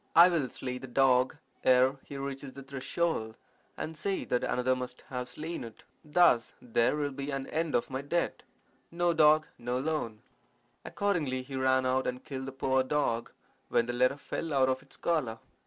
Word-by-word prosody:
I 170 +2 +9
will 155 -7 0
slay 125 +1 -5
the 130 - -8
dog 130 0 +3 0.3
ere 130 +1 +5
he 140 - -8
reaches 135 -1 -5
the 140 - -9
threshold, 135 -3 -2 0.4
and 160 - -4
say 190 +5 -2
that 125 - 0
another 125 +1 +1
must 125 0 -6
have 125 -1 -4
slain 160 -1 -5
it. 115 -2 -11 0.2
Thus 150 -6 +3
there 115 +2 +1
will 145 -1 -1
be 140 +1 -5
an 135 -1 -2
end 160 0 -1
of 120 - 0
my 130 +1 -2
debt. 170 +5 -1 0.5
No 175 0 +1
dog, 155 -1 +5
no 120 +1 -2
loan.' 130 -7 -2 0.6
Accordingly 155 -11 -1
he 135 +1 -8
ran 130 0 +2
out 130 +1 +1
and 125 0 -3
killed 130 -1 -5
the - - -4
poor 130 0 +1
dog, 130 -4 0 0.4
when 115 - +3
the 120 - -3
letter 130 +3 +2
fell 155 +1 -4
out 130 -1 +4
of 130 0 0
its 140 - -17
collar. 145 -10 0
135 Hz, 185 wpm, -30 LUFS, 125-150 Hz, 0.6 s, I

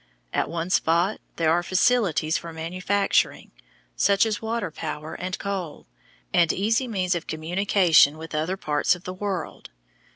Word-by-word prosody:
At - - 0
one 170 +2 -3
spot 170 +4 +2
there 160 -1 +2
are 170 +2 +3
facilities 185 -4 +2
for 170 - -4
manufacturing, 185 +5 0 0.4
such 200 +2 +3
as 215 -2 -2
water 225 -5 -2
power 155 0 -6
and 185 +1 -4
coal, 190 -6 -5 0.5
and 170 -2 +4
easy 225 +6 0
means 185 -5 0
of 170 -2 -4
communication 165 -2 +3
with 160 +1 -9
other 160 +5 -1
parts 150 0 +1
of 180 - -14
the 185 - -5
world. 190 -3 -5
180 Hz, 150 wpm, -24 LUFS, 160-200 Hz, 0.5 s, and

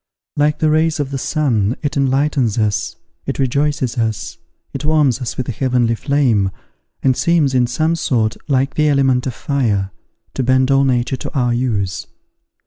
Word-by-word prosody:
Like 150 +1 +2
the 155 -1 +2
rays 155 0 +1
of 140 -2 -2
the 135 - -3
sun, 125 -8 0
it 145 -2 -2
enlightens 135 -4 +1
us, 105 -3 -1 0.3
it - - -2
rejoices 135 -2 0
us, 110 -2 -3 0.3
it - - -5
warms 145 -5 +2
us 125 - -4
with 130 - -3
a - - -1
heavenly 125 0 +1
flame, 115 -6 +1 0.5
and 130 -1 +3
seems, 160 -4 +2
in 125 -1 +3
some 155 +7 0
sort, 115 -9 0
like 135 0 +1
the 155 0 +2
element 135 -3 +2
of 125 - -4
fire, 105 -9 -1 0.4
to - - -2
bend 130 +1 +2
all 135 0 +4
nature 125 0 0
to - - -6
our 120 -2 +1
use. 110 -7 -2
130 Hz, 170 wpm, -18 LUFS, 120-145 Hz, 0.5 s, all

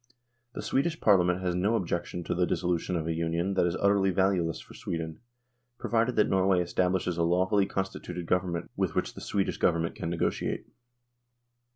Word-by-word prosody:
The - - -6
Swedish 160 +4 0
Parliament 90 -3 +4
has 90 -1 0
no 100 +6 +1
objection 85 -2 -2
to - - -2
the 90 0 +1
dissolu 90 -1 0
tion 90 - -3
of 80 -2 -1
a 80 - -1
union 85 +3 -1
that 90 -2 +2
is 85 - -1
utterly 100 -1 +3
valuless 95 -3 +1
for - - -13
Sweden, 80 -1 -5 0.6
provided 115 +1 0
that 105 - +4
Norway 95 -1 +3
establishes 90 0 0
a - - +3
lawfully 95 +4 +2
consti 95 0 -3
tuted 90 -1 -6
Government 90 -1 -1
with - - -1
which - - -1
the - - -10
Swedish 100 -2 -1
Govern 85 -1 +2
ment 85 - -3
can 80 - -4
negotiate." 85 -1 -1
90 Hz, 185 wpm, -29 LUFS, 85-95 Hz, 0.6 s, Parliament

